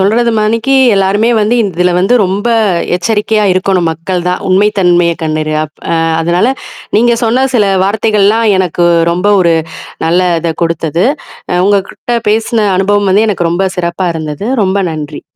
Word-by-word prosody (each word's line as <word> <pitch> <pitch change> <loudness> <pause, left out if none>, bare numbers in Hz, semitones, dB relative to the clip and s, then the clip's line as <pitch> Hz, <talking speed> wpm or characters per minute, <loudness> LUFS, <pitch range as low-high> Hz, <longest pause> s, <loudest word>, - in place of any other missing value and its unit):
சொல்றது 230 +5 +2
மாதிரிக்கு 230 +5 0 0.2
எல்லாருமே 200 +4 +1
வந்து, 215 +3 +1
இதுல 180 -3 0
வந்து 195 +7 +2
ரொம்ப 195 +5 -2 0.5
எச்சரிக்கையா 210 +3 0
இருக்கணும், 185 -2 0
மக்கள் 175 +2 -4
தான். 180 - -2
உண்மை 195 +3 +3
தன்மைய 175 -2 +2
கண்டறிய. 155 -1 -2
அப் 150 - -27 0.2
அ - - +2 0.3
அதனால 175 +5 +1 0.5
நீங்க 240 +2 +3
சொன்ன 250 +4 +1
சில 220 -4 +3 0.2
வார்த்தைகள்லாம் 210 +2 +1
எனக்கு 175 -2 0 0.3
ரொம்ப 180 +4 -1
ஒரு 170 -2 +2 0.5
நல்ல 170 +2 +2 0.2
இத 165 0 -1
கொடுத்தது. 165 0 -1 0.6
உங்ககிட்ட 200 +4 -1
பேசின 220 0 0
அனுபவம் 205 +1 +1
வந்து 205 +4 +3
எனக்கு 175 -4 -1
ரொம்ப 190 +2 0
சிறப்பா 180 +1 -2
இருந்தது. 155 +5 -5 0.2
ரொம்ப 190 +1 0
நன்றி! 150 -1 -7
190 Hz, 145 wpm, -11 LUFS, 170-210 Hz, 0.6 s, உண்மை